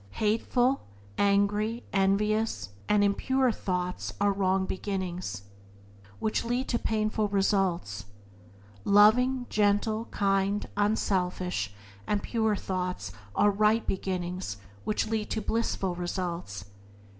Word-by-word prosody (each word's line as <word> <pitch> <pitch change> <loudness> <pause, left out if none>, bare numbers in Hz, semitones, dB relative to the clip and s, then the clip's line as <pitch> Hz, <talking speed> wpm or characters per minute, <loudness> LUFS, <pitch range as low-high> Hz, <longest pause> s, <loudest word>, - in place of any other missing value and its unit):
Hateful, 240 +4 +2 0.4
angry, 205 +3 +2
envious, 210 +3 +2
covetous, - - -8 0.2
and 210 -1 +4
impure 260 +6 +2
thoughts 180 -3 -3
are 205 0 +3
wrong 190 -1 +1
beginnings, 185 - -4 0.7
which 215 - -1
lead 245 +3 -1
to 235 - +1
painful 215 0 0
results. 190 - 0 0.8
Loving, 245 +5 +5
gentle, 215 +2 +2
kind, 195 0 0
unselfish 185 - 0 0.4
and 205 -1 0
pure 220 -2 +1
thoughts 180 - -3 0.2
are 205 - +4
right 215 +3 +2
beginnings, 180 - -3 0.3
which 210 - 0
lead 220 -1 -2
to - - -1
blissful 215 -4 -1
results. 175 - -4
200 Hz, 105 wpm, -28 LUFS, 185-215 Hz, 0.8 s, Loving